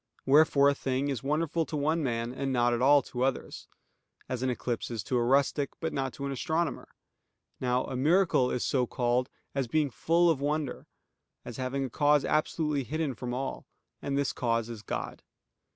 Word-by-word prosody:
Wherefore 140 0 +5
a 140 - +5
thing 135 0 -1
is 135 -5 -2
wonderful 155 +3 0
to 155 - -3
one 155 +3 +1
man, 120 -3 -2
and 135 +1 -2
not 120 -1 +2
at 120 - -1
all 140 +1 +6
to 125 - -6
others: 130 0 -2 0.6
as 125 -1 -3
an 130 - 0
eclipse 120 -1 -3
is 115 -5 -4
to 130 - -2
a 120 - +2
rustic, 140 +2 +2
but 160 -1 -3
not 135 -1 -1
to 140 - -6
an 140 - -2
astronomer. 160 +4 -2 0.7
Now 125 0 +1
a - - -5
miracle 155 -1 +3
is 125 - -1
so 125 -3 +1
called 125 +1 0 0.2
as 135 -2 -1
being 150 +2 +1
full 170 +8 +2
of 140 -4 -2
wonder; 150 0 -2 0.6
as 120 - -7
having 135 +1 -2
a - - -5
cause 145 +1 +3
absolutely 150 -2 0
hidden 155 +1 -2
from 120 +1 -5
all: 130 +2 -4 0.3
and 140 0 -2
this 140 -1 0
cause 115 -2 -1
is 115 -3 -7
God. - - -5
135 Hz, 190 wpm, -29 LUFS, 125-150 Hz, 0.7 s, all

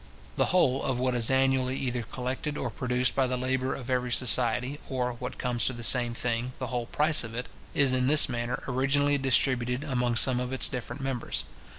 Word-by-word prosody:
The - - +1
whole 140 -8 +1
of 130 -2 -2
what 130 0 0
is 120 -2 +2
annually 130 -1 +1
either 125 -2 -2
collected 130 +5 -5
or 125 - -4
produced 125 +2 0
by 135 -1 +1
the 125 0 -2
labour 130 +1 -2
of 125 - -9
every 125 -1 -2
society, 125 +3 +1
or, 125 -2 -2
what 125 +2 -8
comes 120 -2 -1
to 130 - -1
the 120 -1 -8
same 120 +1 +5
thing, 120 +1 -3
the 130 - -5
whole 120 -1 -3
price 155 +2 +5
of 115 0 -8
it, 125 +1 -4 0.3
is 140 -3 +3
in 125 0 0
this 150 +2 +6
manner 120 0 -4
originally 140 +2 +1
distributed 130 -1 0
among 125 -4 -1
some 125 +1 +4
of 125 +1 -4
its 130 - +4
different 130 +2 -7
members. 130 -3 -3
125 Hz, 205 wpm, -27 LUFS, 125-135 Hz, 0.3 s, this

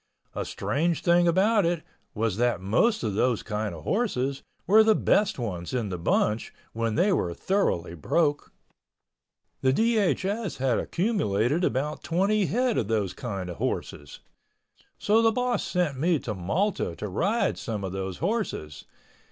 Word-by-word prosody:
A - - -3
strange 165 +3 -1
thing 175 0 +4
about 200 +5 +3
it 170 -1 0 0.3
was 110 -2 -1
that 120 -2 +1
most 120 - +1
of 110 -3 -1
those 120 +2 +1
kind 105 -3 -3
of 80 - -10
horses 140 - -1 0.2
were 215 +4 +6
the 220 0 +4
best 210 0 +2
ones 95 -4 -4
in 115 -5 -1
the 90 - -3
bunch 105 +6 0 0.2
when 115 -1 -1
they 195 +2 +3
were 85 - -1
thoroughly 140 - 0
broke. 145 - 0 1.1
The 130 - +3
DHS 210 - 0
had 130 -3 +1
accumulated 160 - 0
about 150 0 -1
twenty 195 +3 +1
head 245 +1 +1
of 105 - -2
those 105 -4 0
kind 100 -7 -5
of 90 - -7
horses. 75 0 -4 0.8
So 215 +2 +3
the 225 0 +4
boss 250 +1 0
sent 170 -8 -1
me 170 +2 +2
to 115 -6 -4
Malta 105 - -1
to 105 - -5
ride 195 - 0
some 110 -6 -4
of 95 - -3
those 95 -1 -4
horses. 180 - -3
140 Hz, 155 wpm, -26 LUFS, -, 1.1 s, were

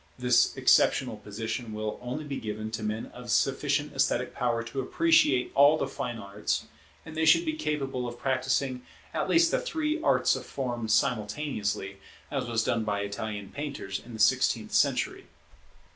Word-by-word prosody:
This 125 -1 +3
exceptional - - +3
position 110 +2 -5
will 110 0 -4
only 125 +5 -4
be 140 -2 -4
given 110 0 -5
to 110 0 -4
men 110 +1 -2
of - - -10
sufficient - - +1
esthetic - - 0
power 120 -2 0
to 115 +4 -4
appreciate 150 - +3
all 145 +3 +6
the 140 - -1
fine 135 -4 -4
arts; 100 0 -3 0.4
and 160 -1 -9
they 160 - 0
should 330 - +5
be 315 - 0
capable 135 - -2
of 120 0 -7
practising 130 0 0 0.3
at - - -1
least 335 0 +4
the - - +1
three 320 -9 -2
arts - - +3
of - - -5
form 120 -4 -4
simultaneously, 105 -3 -1 0.3
as - - -2
was 115 -1 0
done 115 0 0
by 105 -2 -1
Italian 100 0 -5
painters 140 -9 -5
in 120 -1 -10
the - - -9
sixteenth 105 +1 +2
century. - - +1
125 Hz, 165 wpm, -28 LUFS, 110-145 Hz, 0.4 s, all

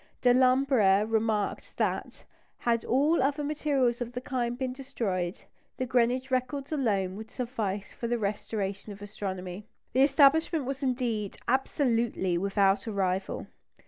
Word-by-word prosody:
Delambre 250 -5 +4
remarked 220 -2 -1
that, - - -2 0.3
had 235 -1 0
all 290 +6 +3
other 285 +2 +1
materials 280 -5 0
of 240 0 -4
the 250 - -3
kind 245 -2 -2
been 260 -1 -2
destroyed, 210 -10 -3 0.4
the 255 - -1
Greenwich 250 +2 +1
records 260 +3 -1
alone 200 -10 0
would 220 +1 -8
suffice 220 -6 -3
for 235 - -4
the 240 +1 0
restoration 205 -1 -3
of 200 0 -10
astronomy. 190 -2 -6 0.3
The 260 - +3
establishment 285 +2 +4
was 270 +1 -4
indeed 240 -6 -1
absolutely 235 - +1
without 195 +2 +2
a - - -2
rival. 190 -1 -1
240 Hz, 135 wpm, -29 LUFS, 205-265 Hz, 0.4 s, Delambre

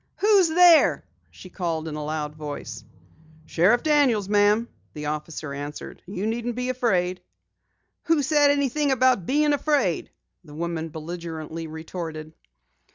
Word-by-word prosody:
"Who's 405 -3 +4
there?" 340 0 +5 0.2
she 185 - -14
called 165 -4 -3
in 155 - -5
a 150 0 -5
loud 150 0 -3
voice. 145 -7 -7 0.6
"Sheriff 190 +11 +2
Daniels, 275 -10 +2
ma'am," 205 +2 +3 0.3
the 150 0 -6
officer 150 -1 -5
answered. 145 +1 -7
"You 195 +1 -4
needn't 235 +1 -2
be 250 +1 -3
afraid." 185 -8 0 0.8
"Who 325 -3 +2
said 290 0 +4
anything 285 +1 +1
about 255 -8 +2
bein' 295 +2 +2
afraid?" 285 - 0 0.3
the 150 -3 -13
woman 165 0 -3
belligerently 160 0 -7
retorted. 160 -1 -7
185 Hz, 130 wpm, -24 LUFS, 160-265 Hz, 0.8 s, there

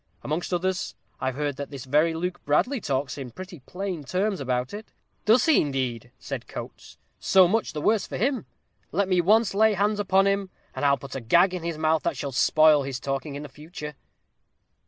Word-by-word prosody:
Amongst 155 +6 -3
others, 185 +1 -1 0.2
I've 130 -1 -2
heard 145 -1 -2
that 140 0 -5
this 140 -3 -8
very 155 +5 +2
Luke 180 +2 -4
Bradley 235 - +1
talks 135 -2 -2
in 130 -2 -6
pretty 180 +6 -10
plain 180 +3 -5
terms 190 +6 -1
about 125 +1 -2
it." 215 +1 -7 0.4
"Does 225 +3 +5
he, 320 - +5
indeed?" 130 -5 -2
said - - -6
Coates. - - -9 0.2
"So 190 -2 +5
much 225 +5 0
the 150 - -4
worse 215 +5 +2
for - - -5
him. 260 +3 0 0.4
Let 200 -1 +1
me 185 -2 +3
once 210 +3 +3
lay 215 +1 +4
hands 205 +2 +1
upon 195 -1 +3
him, 200 -1 0 0.2
and 130 - -5
I'll 140 0 +4
put 140 - -10
a 135 - -4
gag 175 +11 +4
in 180 - -3
his 165 -1 -3
mouth 155 0 +2
that 170 -5 -2
shall 140 - -4
spoil 155 +3 +5
his 135 -2 -4
talking 140 +1 -3
in 145 - -6
the - - -7
future." 150 +2 -9
160 Hz, 200 wpm, -26 LUFS, 140-195 Hz, 0.4 s, Does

